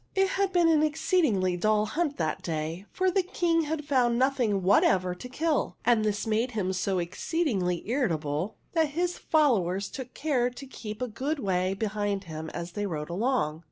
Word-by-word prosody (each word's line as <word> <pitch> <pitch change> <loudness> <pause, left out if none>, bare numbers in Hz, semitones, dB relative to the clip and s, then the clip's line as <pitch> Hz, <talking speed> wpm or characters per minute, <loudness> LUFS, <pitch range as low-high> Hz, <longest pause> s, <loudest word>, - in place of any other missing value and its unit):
It 385 0 +3
had 390 -1 0
been 350 -2 +4
an 315 -2 +4
exceedingly 300 - +2
dull 215 +3 +2
hunt 295 +6 -1
that 155 -2 -1
day, 165 +4 -4
for 370 0 +1
the 385 - +3
King 340 -3 +1
had 300 -1 -3
found 250 -5 +2
nothing 245 -7 +1
whatever 185 -1 +3
to 215 +8 -9
kill, 305 +3 -1
and 230 -2 +4
this 210 -1 -1
made 225 +3 0
him 190 -4 -1
so 185 +1 0
exceedingly 185 - -1
irri 250 0 +1
table 155 +4 -2 0.2
that 320 -3 +2
his 355 0 0
followers 200 - +2
took 255 -2 -8
care 265 -5 +1
to 250 +3 -10
keep 220 -3 -7
a - - -1
good 265 +8 -2
way 190 -5 0
behind 205 -1 -2
him 160 -2 -6
as 170 +2 -6
they 205 +2 -2
rode 155 -2 -4
along. 190 - 0
220 Hz, 185 wpm, -28 LUFS, 185-295 Hz, 0.2 s, been